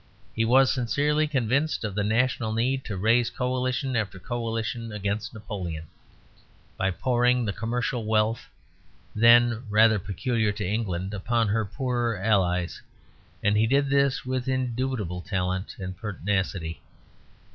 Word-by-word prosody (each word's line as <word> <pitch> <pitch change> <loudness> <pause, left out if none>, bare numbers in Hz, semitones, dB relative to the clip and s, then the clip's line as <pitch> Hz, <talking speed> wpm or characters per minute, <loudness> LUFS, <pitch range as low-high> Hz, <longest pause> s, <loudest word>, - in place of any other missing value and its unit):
He 115 - +1
was 130 +3 +5
sincerely 145 +4 +1
convinced 140 +2 0
of 105 -3 -3
the 105 +1 -1
national 110 +1 +1
need 130 +4 0
to 100 -4 -4
raise 115 +5 +3
coalition 130 +1 -1
after 105 -4 -1
coalition 115 +1 -3
against 105 0 -3
Napoleon, 90 -7 -6 0.9
by 95 - 0
pouring 125 +4 +2
the 105 - -1
commercial 120 +2 -2
wealth 110 +1 0 0.6
then 115 +1 +5
rather 110 0 +5
peculiar 105 +4 -1
to 105 -2 -4
England 95 -3 -2
upon 115 +2 0
her 110 +1 +1
poorer 120 0 -1
Allies, 90 -3 +1 0.6
and 105 +1 +3
he 110 +1 +3
did 140 +2 +2
this 140 -2 +2
with 130 0 -2
indubitable 125 -7 -2
talent 95 0 -2
and 95 -1 -6
pertinacity. 95 -4 -3
115 Hz, 130 wpm, -26 LUFS, 100-125 Hz, 0.9 s, was